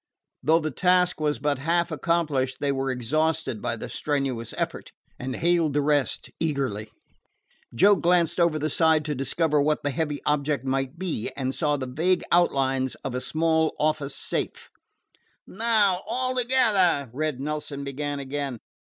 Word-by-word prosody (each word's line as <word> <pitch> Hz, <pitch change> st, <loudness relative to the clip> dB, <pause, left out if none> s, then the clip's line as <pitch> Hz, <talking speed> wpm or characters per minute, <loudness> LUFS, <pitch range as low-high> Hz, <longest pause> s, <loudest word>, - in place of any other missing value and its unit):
Though 160 Hz, +2 st, +4 dB
the 155 Hz, -2 st, -2 dB
task 180 Hz, +2 st, +2 dB
was 150 Hz, -3 st, +1 dB
but 145 Hz, +1 st, -1 dB
half 170 Hz, +4 st, 0 dB
accomplished, 150 Hz, -4 st, 0 dB
they 145 Hz, -1 st, 0 dB
were 135 Hz, 0 st, -1 dB
exhausted 150 Hz, +1 st, 0 dB
by 120 Hz, -1 st, -2 dB
the 115 Hz, -, -7 dB
strenuous 135 Hz, -6 st, -2 dB
effort, -, -, -4 dB, 0.3 s
and 130 Hz, 0 st, -4 dB
hailed 170 Hz, -3 st, +2 dB
the 145 Hz, -, +2 dB
rest 145 Hz, -1 st, 0 dB
eagerly. 135 Hz, -9 st, -2 dB, 0.9 s
Joe 200 Hz, -, +6 dB
glanced 175 Hz, -1 st, +2 dB
over 170 Hz, -2 st, +3 dB
the 155 Hz, 0 st, -1 dB
side 160 Hz, -1 st, +3 dB
to 150 Hz, -, -1 dB
discover 150 Hz, +3 st, +1 dB
what 150 Hz, +1 st, +1 dB
the 145 Hz, -, 0 dB
heavy 150 Hz, +1 st, -2 dB
object 145 Hz, -2 st, 0 dB
might 135 Hz, +3 st, -1 dB
be, 170 Hz, -11 st, -3 dB
and 130 Hz, -1 st, -2 dB
saw 150 Hz, -2 st, 0 dB
the 130 Hz, -, -4 dB
vague 165 Hz, +8 st, +1 dB
outlines 135 Hz, -6 st, +2 dB
of 135 Hz, -, -3 dB
a 125 Hz, -, -2 dB
small 160 Hz, +2 st, +1 dB
office 150 Hz, -2 st, 0 dB
safe. -, -, -4 dB, 0.7 s
"Now 210 Hz, -3 st, +2 dB
all 255 Hz, 0 st, -1 dB
together!" 215 Hz, -, +3 dB
Red 150 Hz, -1 st, -2 dB
Nelson 150 Hz, 0 st, -4 dB
began 145 Hz, +1 st, -3 dB
again. 140 Hz, -2 st, -4 dB
150 Hz, 155 wpm, -25 LUFS, 135-170 Hz, 0.9 s, Joe